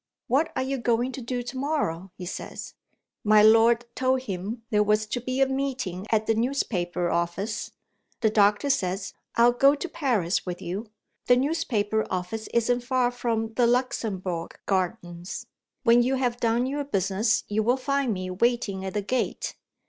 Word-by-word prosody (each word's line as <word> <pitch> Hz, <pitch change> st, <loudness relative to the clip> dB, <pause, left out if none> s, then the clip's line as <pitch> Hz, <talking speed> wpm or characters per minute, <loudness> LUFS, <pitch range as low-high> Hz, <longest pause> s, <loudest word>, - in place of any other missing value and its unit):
What 295 Hz, +6 st, +1 dB
are 260 Hz, -, 0 dB
you 270 Hz, 0 st, -2 dB
going 240 Hz, +2 st, +1 dB
to 260 Hz, -, -7 dB
do 245 Hz, +1 st, -3 dB
to 245 Hz, +2 st, -6 dB
morrow?' 195 Hz, -, -1 dB
he 180 Hz, -, -6 dB
says. 180 Hz, -, -6 dB, 0.5 s
My 210 Hz, 0 st, +6 dB
lord 225 Hz, +2 st, +5 dB
told 260 Hz, 0 st, +1 dB
him 205 Hz, +2 st, -5 dB
there 210 Hz, -1 st, +4 dB
was 210 Hz, +1 st, +2 dB
to 240 Hz, +3 st, -3 dB
be 255 Hz, +2 st, -2 dB
a -, -, +7 dB
meeting 265 Hz, -9 st, -3 dB
at 220 Hz, -1 st, +2 dB
the 225 Hz, -, +2 dB
newspaper 190 Hz, -8 st, -1 dB
office. 180 Hz, +6 st, -2 dB, 0.5 s
The 220 Hz, -2 st, +3 dB
doctor 210 Hz, +6 st, +3 dB
says: 195 Hz, -6 st, -1 dB, 0.2 s
'I'll 235 Hz, +1 st, +6 dB
go 275 Hz, +4 st, +5 dB
to 295 Hz, -, -4 dB
Paris 235 Hz, -, 0 dB
with 180 Hz, -1 st, -5 dB
you. 195 Hz, +6 st, -5 dB, 0.4 s
The 245 Hz, -, +6 dB
newspaper 245 Hz, -8 st, 0 dB
office 185 Hz, +5 st, -3 dB
isn't 240 Hz, +1 st, +2 dB
far 250 Hz, -1 st, +1 dB
from 225 Hz, -2 st, -2 dB
the 240 Hz, 0 st, +3 dB
Luxembourg 200 Hz, -8 st, -1 dB
Gardens. 180 Hz, -2 st, -2 dB, 0.4 s
When 235 Hz, -1 st, +6 dB
you 255 Hz, +2 st, +1 dB
have 250 Hz, -2 st, 0 dB
done 235 Hz, +1 st, +2 dB
your 285 Hz, +2 st, -2 dB
business, 200 Hz, -2 st, +1 dB
you 210 Hz, +1 st, 0 dB
will 240 Hz, +4 st, +2 dB
find 275 Hz, -1 st, 0 dB
me 185 Hz, -2 st, -3 dB
waiting 200 Hz, -1 st, 0 dB
at 190 Hz, 0 st, -5 dB
the 205 Hz, -, 0 dB
gate. 255 Hz, +5 st, -2 dB
225 Hz, 170 wpm, -26 LUFS, 195-255 Hz, 0.5 s, a